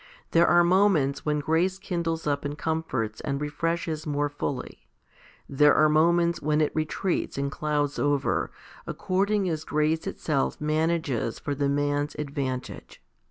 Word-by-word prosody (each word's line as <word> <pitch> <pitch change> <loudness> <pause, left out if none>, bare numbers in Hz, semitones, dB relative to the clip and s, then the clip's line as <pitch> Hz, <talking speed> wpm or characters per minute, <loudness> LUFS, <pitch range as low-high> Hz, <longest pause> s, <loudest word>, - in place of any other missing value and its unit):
There 170 +1 +5
are 175 0 +5
moments 170 -7 +2
when 150 0 +1
grace 170 +5 +1
kindles 170 -4 -3
up 145 -1 0
and 145 +1 -4
comforts 145 -10 -2
and 140 -1 -2
refreshes 160 +1 -2
more 145 0 0
fully; 145 -2 -5 0.6
there 145 +2 +4
are 155 0 +5
moments 170 +2 +3
when 150 +1 +1
it 155 - +2
retreats 160 +3 -1
and 140 0 -1
clouds 145 -1 -1
over, 145 -1 +1 0.4
according 195 +1 0
as 160 -3 -2
grace 155 +3 0
itself 150 -7 -1
manages 155 -6 0
for 145 - -3
the 140 0 0
man's 145 +1 0
advantage. 140 -4 -5
150 Hz, 140 wpm, -26 LUFS, 145-165 Hz, 0.6 s, There